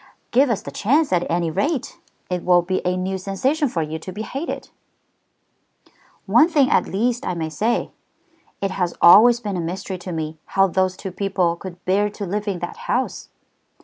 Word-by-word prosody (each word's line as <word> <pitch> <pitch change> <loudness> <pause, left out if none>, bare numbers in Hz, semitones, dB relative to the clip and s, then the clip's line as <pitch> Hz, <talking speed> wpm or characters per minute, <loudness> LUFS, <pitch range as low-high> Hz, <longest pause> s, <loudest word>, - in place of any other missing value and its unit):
"Give 265 +3 +4
us 210 -4 -1
the - - -7
chance 280 +4 +1
at 175 -1 +1
any 170 -1 0
rate. 285 - -2 0.3
It 180 -1 -3
will 175 -1 +4
be 185 +2 -1
a 180 0 0
new 190 +1 -2
sensation 260 - 0
for 165 -7 -1
you 155 +1 -5
to 185 - -8
be 210 +4 -5
hated." 275 +8 -5 1.6
"One 315 +2 +5
thing 290 -4 +3
at - - +3
least 235 +5 -1
I 180 - -2
may 160 -2 -3
say. 215 +10 -1 0.7
It 195 -1 -1
has 180 -2 -2
always 230 +7 +8
been 205 -5 -4
a - - -1
mystery 185 +2 -5
to 180 +1 -7
me 160 -1 -4 0.2
how 195 - +7
those 185 0 0
two 190 - -6
people 185 -3 0
could 175 0 -10
bear 200 +3 +2
to 205 0 -6
live 205 +3 -3
in 195 -3 -1
that 440 - -5
house." - - -1
190 Hz, 190 wpm, -21 LUFS, 175-225 Hz, 1.6 s, always